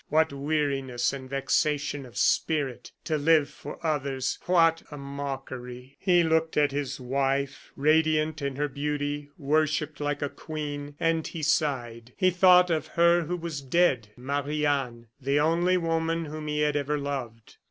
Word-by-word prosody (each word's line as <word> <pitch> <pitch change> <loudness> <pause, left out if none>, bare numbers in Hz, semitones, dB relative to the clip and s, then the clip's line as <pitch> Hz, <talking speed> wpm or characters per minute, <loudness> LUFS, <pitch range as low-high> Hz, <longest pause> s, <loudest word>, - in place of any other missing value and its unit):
What 160 -1 +2
weariness 140 -4 -1
and 130 -1 -7
vexation 140 0 0
of 120 - -13
spirit! 145 -6 0
To 155 -2 -1
live 155 -1 +3
for 145 - -9
others 140 -4 -1
what 165 -2 +4
a 150 - -8
mockery!" 135 -2 -7
He 175 -3 +4
looked 160 0 +1
at 145 -1 +3
his 140 -1 -3
wife, 135 +2 -1
radiant 155 +1 +2
in 140 -1 -2
her 150 +2 0
beauty, 145 0 -3
worshipped 155 +1 0
like 145 -1 -2
a - - +1
queen, 145 -2 -6
and 165 -1 +1
he 165 -3 -6
sighed. 125 -6 -1
He 185 0 +3
thought 180 0 +6
of 155 -1 0
her 170 0 +5
who 180 +3 -2
was 165 -4 -5
dead 135 -6 +2
Marie 145 +3 -2
Anne 130 -5 -1 0.2
the 140 +2 +1
only 170 +4 +3
woman 165 -1 0
whom 155 0 -6
he 150 0 -1
had 150 -1 +1
ever 145 +1 0
loved. 130 -6 -5
145 Hz, 155 wpm, -27 LUFS, 140-160 Hz, 0.2 s, thought